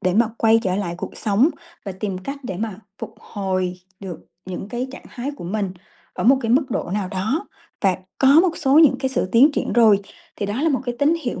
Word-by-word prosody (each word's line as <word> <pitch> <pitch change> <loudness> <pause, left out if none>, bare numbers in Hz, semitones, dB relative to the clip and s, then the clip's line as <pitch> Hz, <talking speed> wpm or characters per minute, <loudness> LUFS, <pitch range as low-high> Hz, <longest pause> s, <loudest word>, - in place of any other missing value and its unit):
để 185 - +1
mà 230 +1 +4
quay 225 0 +4
trở 185 -1 0
lại 185 -4 -2
cuộc - - -6
sống, 220 +8 +2 0.3
và 195 - -4
tìm 190 0 -4
cách 275 +9 -6
để 190 -7 -4
mà 215 -1 -4 0.2
phục - - -7
hồi 185 -2 -3 0.2
được 185 -5 -7 0.3
những 185 +2 -6
cái 245 +2 -3
trạng - - -11
thái 255 +4 -5
của - - -9
mình 195 +2 -2 0.4
ở - - -3
một 265 +3 +6
cái 225 - -1
mức 270 +1 +2
độ 195 - -2
nào 200 -3 -1
đó, 210 - -2 0.3
và 190 -3 +3 0.2
có 265 - +4
một 345 -2 +1
số 275 +2 +4
những 315 -4 +6
cái 265 - -1
sự 220 - -1
tiến 270 +6 +6
triển - - -2
rồi, 220 -4 +5 0.4
thì 200 - -2
đó 215 +8 -2
là 325 - +3
một 270 - +1
cái 245 -2 -3
tín 295 +3 +3
hiệu 245 - -3
220 Hz, 235 wpm, -21 LUFS, 190-265 Hz, 0.4 s, một